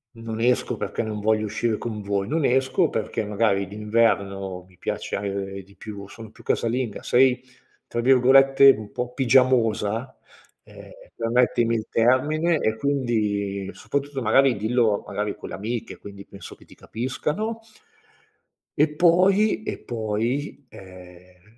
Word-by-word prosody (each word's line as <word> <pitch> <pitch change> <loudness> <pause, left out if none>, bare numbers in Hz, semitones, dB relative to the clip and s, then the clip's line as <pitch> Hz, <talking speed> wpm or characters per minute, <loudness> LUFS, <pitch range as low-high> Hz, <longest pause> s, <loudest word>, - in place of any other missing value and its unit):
"non 115 -1 -6
esco 125 +1 +1
perché - - -3
non 105 -1 -4
voglio 110 +1 +1
uscire 110 +1 -1
con 110 -3 -5
voi. 100 0 -2
Non 155 +2 -1
esco 130 +6 +2
perché 110 0 -3
magari 100 -2 0
d'inverno 100 -3 -1
mi 90 -2 -24
piace 100 -1 -4
di 100 +1 -21
più 100 -2 -9
sono 110 0 -12
più - - -18
casalinga". 115 -2 -2
Sei 125 0 +3 0.5
tra 120 - -4
virgolette 135 +2 +6
un 105 -4 -6
po' 125 0 -4
"pigiamosa," 125 -2 +2 0.5
ehm, - - -14 0.3
permettimi 115 0 +1
il 110 -1 -3
termine, 150 +8 +2
e 110 -4 0
quindi 105 -7 -1
soprattutto 140 -1 -4
magari 130 +3 +4
dillo 110 -1 +1
magari 105 0 -3
con - - -10
le - - -6
amiche, 115 +4 -5
quindi 100 -1 -11
penso 100 - -11
che - - -20
ti - - -17
capiscano. 150 - -4 1.2
E 150 - +5
poi, 190 +6 +3
e - - -5
poi, 120 +5 -3
ehm, 90 +2 -15
115 Hz, 135 wpm, -23 LUFS, 100-130 Hz, 1.2 s, virgolette